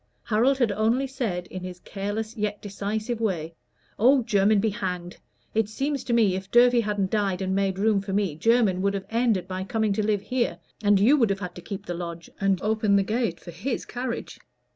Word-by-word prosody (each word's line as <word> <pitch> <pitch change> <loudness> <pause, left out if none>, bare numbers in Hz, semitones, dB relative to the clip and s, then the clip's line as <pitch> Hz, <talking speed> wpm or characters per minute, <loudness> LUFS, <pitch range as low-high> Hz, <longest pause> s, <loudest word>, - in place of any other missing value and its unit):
Harold 245 +5 +2
had 240 -5 +2
only 225 +6 +1
said, 230 -10 -3
in 185 - -6
his 180 0 -7
careless 210 +3 -4
yet 210 -2 -2
decisive 215 +3 -3
way, 170 -7 -1 0.5
"Oh, 255 +3 +5
Jermyn 205 -1 +3
be 220 +1 +1
hanged! 180 -4 -4 0.4
It 220 -1 +1
seems 275 +4 -2
to 240 - -1
me 220 -5 +4
if 190 +1 -5
Durfey 245 +1 +5
hadn't 205 -3 -1
died 200 -4 0
and 190 -1 -1
made 195 -1 0
room 205 0 +2
for 195 0 -6
me, 195 -5 0
Jermyn 210 0 +3
would 200 +1 +1
have 195 - -4
ended 225 -6 +1
by 185 0 -4
coming 215 +1 0
to 215 - 0
live 205 -1 +1
here, 235 -5 -1 0.2
and 205 -2 +4
you 250 +9 +5
would 230 -6 +3
have 195 -1 -1
had 180 -3 -5
to 180 - -10
keep 200 +2 -7
the 175 - -3
lodge 170 -1 -6
and 195 -2 +2
open 215 -1 +2
the 200 - +4
gate 220 -4 -1
for 175 - -10
his 230 +10 -3
carriage. 245 -1 -5
205 Hz, 210 wpm, -25 LUFS, 190-230 Hz, 0.5 s, Oh